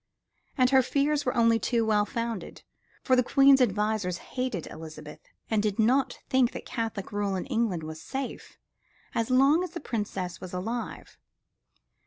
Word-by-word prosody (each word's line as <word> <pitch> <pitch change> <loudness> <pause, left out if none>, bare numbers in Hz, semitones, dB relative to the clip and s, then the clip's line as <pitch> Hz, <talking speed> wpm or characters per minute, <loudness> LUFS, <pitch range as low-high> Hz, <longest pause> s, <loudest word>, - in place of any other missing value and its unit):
And 255 -1 +4
her 265 -1 +6
fears 285 +2 0
were 250 - 0
only 230 -1 +4
too 230 +3 +1
well 210 -1 +2
founded, 230 -2 -4 0.4
for 255 - +4
the 250 - +5
Queen's 275 +1 +5
advisors 210 -4 +1 0.2
hated 250 -9 -2
Elizabeth 155 -2 -9 0.3
and 220 -2 +1
did 210 -2 -1
not 250 +4 +2
think 260 -2 +2
that - - -7
Catholic 225 -4 -4
rule 205 -1 -1
in 185 - -3
England 225 - -1
was 160 0 -7
safe 270 -1 -6 0.6
as 230 -1 -1
long 275 +7 +4
as 360 - -6
the - - -3
Princess 195 - -4
was 185 - -8
alive. 225 +7 -5
230 Hz, 160 wpm, -28 LUFS, 200-260 Hz, 0.6 s, her